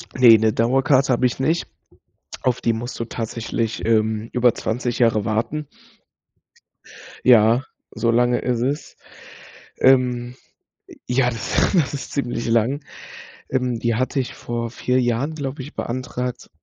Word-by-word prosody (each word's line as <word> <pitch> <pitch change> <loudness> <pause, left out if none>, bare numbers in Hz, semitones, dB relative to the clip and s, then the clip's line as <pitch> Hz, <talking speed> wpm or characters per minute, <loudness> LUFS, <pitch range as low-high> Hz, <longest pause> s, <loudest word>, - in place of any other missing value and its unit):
Ne, 120 -3 +8
‘ne 110 0 +2
Dauerkarte 130 +4 +2
habe 125 - +1
ich 125 - 0
nicht. 160 +5 0 0.7
Auf 125 -2 0
die 115 - +2
musst 120 +3 -6
du 115 - -2
tatsächlich, 115 0 -3
ähm, 110 0 +1
über 125 -1 +3
20 120 +1 -3
Jahre 115 -4 +2
warten. 120 +8 -2 1.6
Ja, 120 0 +5 0.3
so 115 - -1
lange 120 +1 +2
es 125 -2 -1
ist. 140 +5 -3 0.8
Ähm, 125 -2 +3 0.7
ja, 125 0 +2
das 115 -2 0
das 160 -7 +2
ist 140 - -6
ziemlich 120 -4 -2
lang. 115 +6 +1 0.7
Ähm, 125 -3 -1
die 115 -1 0
hatte 130 +4 -1
ich 130 - -3
vor 115 0 -4
4 125 +2 0
Jahren, 125 +6 -1
glaube 140 -2 -5
ich, 140 +4 -10
beantragt 125 0 -4
120 Hz, 135 wpm, -21 LUFS, 115-130 Hz, 1.6 s, Ne